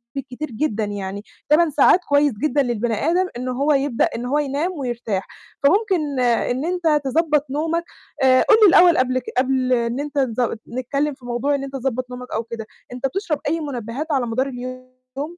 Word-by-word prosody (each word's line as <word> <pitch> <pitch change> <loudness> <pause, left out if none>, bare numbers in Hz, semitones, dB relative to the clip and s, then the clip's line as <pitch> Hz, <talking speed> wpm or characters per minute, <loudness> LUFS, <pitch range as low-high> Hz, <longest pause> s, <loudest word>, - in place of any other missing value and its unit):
بالكتير 270 +1 -6
جدًا 220 -3 -1
يعني، 200 -1 -5 0.3
8 320 +2 +5
ساعات 300 +5 +5
كويس 285 -1 +3
جدًا 290 -1 +2
للبني 240 -1 -1 0.2
آدم 365 +2 +2
إن 255 - -4
هو 280 +4 +1
يبدأ 275 -3 +1
إن 235 - -4
هو 285 +4 +1
ينام 295 +5 -1
ويرتاح، 235 -6 -3 0.4
فممكن 325 - +2
إن 245 +3 +1
أنت 335 -4 +1
تضبّط 300 +1 +1
نومك، 325 +4 -1 0.4
آآ 255 0 +6
قُل 440 - +5
لي - - +9
الأول 350 -1 +6
قبل 255 0 +2
ك 250 - -14
قبل 255 -1 +2
إن 235 +2 0
أنت 290 0 -5
تض 240 -3 0
نتكلّم 275 +4 -2
في 265 -2 -16
موضوع 245 +4 0
إن 275 - -3
أنت 275 0 -7
تضبَّط 255 -1 -2
نومك 250 0 -8
أو 225 - -1
كده، 225 -1 -7 0.3
أنت 255 +2 -1
بتشرب 355 -3 -2
أي 325 +3 0
مُنبهات 265 0 -5
على 265 -4 +1
مدار 255 +4 0
اليوم؟ 255 +1 -8
265 Hz, 185 wpm, -21 LUFS, 245-295 Hz, 0.4 s, لي